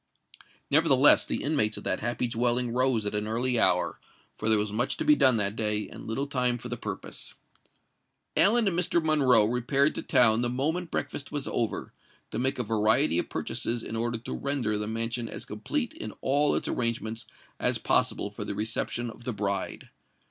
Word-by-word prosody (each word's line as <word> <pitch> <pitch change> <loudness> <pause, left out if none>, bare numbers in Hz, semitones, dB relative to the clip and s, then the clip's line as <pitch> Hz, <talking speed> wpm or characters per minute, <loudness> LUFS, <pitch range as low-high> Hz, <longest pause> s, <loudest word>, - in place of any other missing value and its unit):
Nevertheless, 145 -2 +6
the - - -2
inmates 140 -8 +1
of - - -8
that 95 - -1
happy 120 +2 -2
dwelling 120 +1 0
rose 125 -3 +1
at 105 - -3
an 105 0 -2
early 120 +2 0
hour—for 95 +3 -1
there 110 - +5
was 105 0 -1
much 120 +4 0
to - - -3
be 150 - +6
done 130 -4 +4
that 100 -1 +1
day, 105 -1 -1
and - - -10
little 115 +5 -2
time 125 -3 +1
for 120 +1 -8
the 120 - -2
purpose. 105 -4 -7 1.0
Ellen 225 +2 +4
and 185 - 0
Mr. 175 -1 +2
Monroe 135 -8 +4
repaired 125 +5 +1
to - - -4
town 115 -2 +4
the 120 - 0
moment 160 +8 -2
breakfast 145 - -4
was 145 -2 -3
over, 115 - -3 0.4
to - - -3
make 130 +2 0
a 125 - -1
variety 110 - +2
of - - -3
purchases 120 0 -2
in 115 - -6
order 120 +1 -2
to 115 - -7
render 135 -6 -2
the 105 0 -3
mansion 115 +1 -3
as - - -6
complete 235 - -3
in 325 +1 -7
all 145 +2 +2
its - - -2
arrangements 115 -2 -2 0.3
as - - +2
possible - - 0
for - - -7
the 100 - -5
reception 115 +2 -3
of 120 - -15
the 125 - -3
bride. 100 -1 -4
120 Hz, 190 wpm, -27 LUFS, 110-135 Hz, 1.0 s, Nevertheless